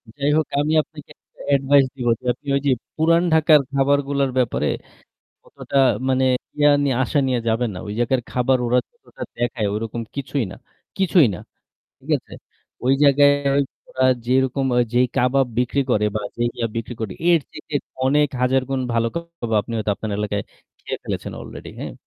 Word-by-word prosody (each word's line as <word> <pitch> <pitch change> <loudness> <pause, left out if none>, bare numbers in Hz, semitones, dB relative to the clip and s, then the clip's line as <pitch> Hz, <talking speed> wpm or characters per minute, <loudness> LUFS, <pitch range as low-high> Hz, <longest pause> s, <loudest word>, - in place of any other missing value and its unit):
যাই 145 0 0
হোক, 155 - +2 0.2
আমি 155 +2 0
আপনাকে 150 -1 -14
একটা - - -20
advice 135 0 +4
দিব 125 -2 -3
যে - - -17
আপনি 140 - -22
ওইযে 140 0 +1 0.2
পুরান 165 +2 +3
ঢাকার 155 -1 +6
খাবারগুলোর 140 0 +1
ব্যাপারে 125 -2 +1 0.8
অতটা 140 - -4 0.3
মানে 130 0 +2 0.3
ইয়া 145 0 +5
নিয়ে 135 -3 +1
আশা 145 +3 0
নিয়ে 125 -2 +1
যাবেন 115 +1 +1
না। - - -6
ওই 105 - -4
জায়গার 120 +1 +1
খাবার 125 +1 +2
ওরা 125 +1 +3
যতটা 475 - -11
দেখায় 120 -3 -1
ওরকম 115 +2 -4
কিছুই 135 -1 -2
না - - -8 0.4
কিছুই 180 -7 +4
না। - - -9 0.6
ঠিক - - -11
আছে? - - -22 0.5
ওই 130 - +4
জায়গায় 145 0 +6 0.3
ওই 140 - +4 0.3
ওরা 130 0 0 0.2
যেইরকম 130 +1 +1 0.3
যেই 125 +1 +4
কাবাব 130 +1 +3
বিক্রি 125 +3 +1
করে 105 -2 +2
বা 105 - -1 0.2
যেই 120 0 +1
ইয়া 115 -1 -1
বিক্রি 115 +1 -4
করে 105 -4 -3 0.2
এর 170 -2 +5
চাইতে 150 - -10 0.3
অনেক 145 +1 +3
হাজার 130 +1 +2
গুণ 135 -1 0
ভালো 115 0 +1
কাবাব 170 -8 -6
আপনি 115 - -8
হয়তো 110 -1 -1
আপনার 110 0 -5
এলাকায় 105 -1 -2 0.4
খেয়ে - - -5
ফেলেছেন - - -4
অলরেডি, - - -9
হ্যাঁ? - - -5
130 Hz, 175 wpm, -21 LUFS, 120-145 Hz, 0.8 s, ঢাকার